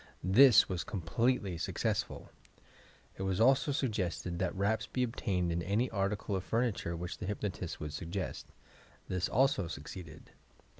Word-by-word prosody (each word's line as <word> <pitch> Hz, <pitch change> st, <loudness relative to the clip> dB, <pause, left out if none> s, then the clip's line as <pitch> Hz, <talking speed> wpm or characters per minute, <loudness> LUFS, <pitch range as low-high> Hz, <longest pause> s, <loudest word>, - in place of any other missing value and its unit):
This 110 Hz, +6 st, +7 dB
was 90 Hz, -2 st, -2 dB
completely 100 Hz, 0 st, 0 dB
successful. -, -, -2 dB, 0.9 s
It -, -, -6 dB
was 95 Hz, -1 st, -1 dB
also 135 Hz, +4 st, +4 dB
suggested 95 Hz, -, -2 dB
that 90 Hz, -3 st, -1 dB
raps 110 Hz, +3 st, 0 dB
be 125 Hz, -, -1 dB
obtained 95 Hz, -7 st, -1 dB
on 85 Hz, +1 st, -1 dB
any 105 Hz, +8 st, 0 dB
article 100 Hz, 0 st, -1 dB
of 95 Hz, -, -2 dB
furni 115 Hz, 0 st, +2 dB
ture 85 Hz, -3 st, -4 dB
which 90 Hz, +1 st, -5 dB
the -, -, -4 dB
hypnotist 100 Hz, -4 st, -4 dB
would 75 Hz, -1 st, -5 dB
suggest. 85 Hz, +5 st, -4 dB, 0.6 s
This 90 Hz, -1 st, -1 dB
also 130 Hz, -7 st, +2 dB
suc 75 Hz, -2 st, -6 dB
ceeded. 80 Hz, -4 st, -10 dB
95 Hz, 150 wpm, -32 LUFS, 90-115 Hz, 0.9 s, This